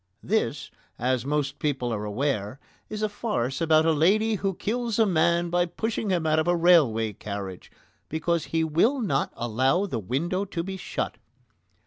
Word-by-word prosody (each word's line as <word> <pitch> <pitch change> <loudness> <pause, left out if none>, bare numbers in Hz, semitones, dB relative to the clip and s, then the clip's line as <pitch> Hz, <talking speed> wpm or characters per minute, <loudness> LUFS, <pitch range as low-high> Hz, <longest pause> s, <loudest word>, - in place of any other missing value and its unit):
This, - - -1 0.3
as 130 +1 0
most 145 -1 -1
people 130 -5 -1
are 105 -1 -3
aware, 105 +1 -2 0.3
is 215 0 -4
a - - +3
farce 185 - -2
about 160 -1 +4
a 165 - +4
lady 200 +9 +3
who 195 -2 -1
kills 230 +2 -2
a 225 - +5
man 170 -1 +2
by 175 0 +2
pushing 220 +4 -3
him 175 -4 +1
out 155 0 +3
of 160 - 0
a 175 - +3
railway 140 -11 +4
carriage 100 -2 -7 0.4
because 165 +1 -1
he 165 0 0
will 170 - +2
not 155 - 0
allow 130 - +1
the 130 - -3
window 165 - -1
to 180 -4 -4
be 190 +2 -5
shut. 190 - -4
160 Hz, 170 wpm, -26 LUFS, 130-190 Hz, 0.4 s, a